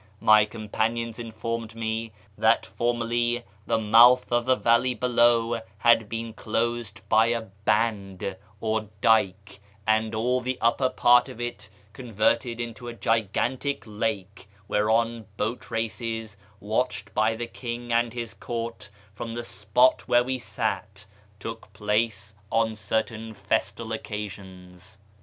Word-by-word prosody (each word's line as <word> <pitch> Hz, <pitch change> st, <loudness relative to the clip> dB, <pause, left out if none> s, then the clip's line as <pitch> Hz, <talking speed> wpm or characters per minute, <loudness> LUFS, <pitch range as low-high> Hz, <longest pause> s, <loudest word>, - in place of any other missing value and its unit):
My 110 Hz, -1 st, +6 dB
companions 115 Hz, +2 st, -2 dB
informed 115 Hz, 0 st, -4 dB
me 110 Hz, 0 st, -3 dB, 0.2 s
that 110 Hz, +3 st, +3 dB
formerly 120 Hz, +3 st, 0 dB, 0.2 s
the 115 Hz, -, +2 dB
mouth 115 Hz, +4 st, +6 dB
of 120 Hz, 0 st, +2 dB
the 130 Hz, -, +5 dB
valley 125 Hz, +2 st, +3 dB
below 120 Hz, -1 st, +3 dB, 0.2 s
had 115 Hz, -1 st, +4 dB
been 115 Hz, 0 st, -4 dB
closed 115 Hz, -1 st, -2 dB
by 110 Hz, +1 st, +5 dB
a 115 Hz, -1 st, -1 dB, 0.2 s
" -, -, -31 dB
hand 100 Hz, -4 st, 0 dB
" 105 Hz, -1 st, -30 dB
or 110 Hz, -1 st, -1 dB
dyke, 100 Hz, -3 st, +2 dB, 0.3 s
and 110 Hz, 0 st, +1 dB
all 125 Hz, +3 st, +1 dB
the 130 Hz, +1 st, -2 dB
upper 130 Hz, +3 st, +2 dB
part 120 Hz, -1 st, +4 dB
of -, -, -10 dB
it 120 Hz, 0 st, -5 dB, 0.2 s
converted 115 Hz, +1 st, 0 dB
into 120 Hz, +1 st, -6 dB
a 120 Hz, -, -6 dB
gigantic 115 Hz, +4 st, 0 dB
lake 105 Hz, -3 st, -4 dB, 0.2 s
whereon 115 Hz, +1 st, +1 dB
boat 115 Hz, +4 st, -3 dB
races, 115 Hz, -1 st, -3 dB, 0.2 s
watched 110 Hz, +5 st, -2 dB
by 110 Hz, +1 st, +2 dB
the 120 Hz, +1 st, -4 dB
king 120 Hz, 0 st, -5 dB
and 120 Hz, 0 st, +2 dB
his 120 Hz, -2 st, -5 dB
court 115 Hz, -3 st, -5 dB, 0.2 s
from 115 Hz, +2 st, -6 dB
the 120 Hz, -, -4 dB
spot 105 Hz, +4 st, +2 dB
where 120 Hz, 0 st, +4 dB
we 130 Hz, +1 st, -2 dB
sat, 105 Hz, -2 st, -3 dB, 0.3 s
took 115 Hz, +3 st, -7 dB
place 105 Hz, -1 st, -1 dB, 0.2 s
on 115 Hz, -1 st, +2 dB
certain 110 Hz, +1 st, -3 dB
festal 105 Hz, +2 st, -2 dB
occasions. 95 Hz, -3 st, -8 dB
115 Hz, 135 wpm, -26 LUFS, 105-120 Hz, 0.3 s, My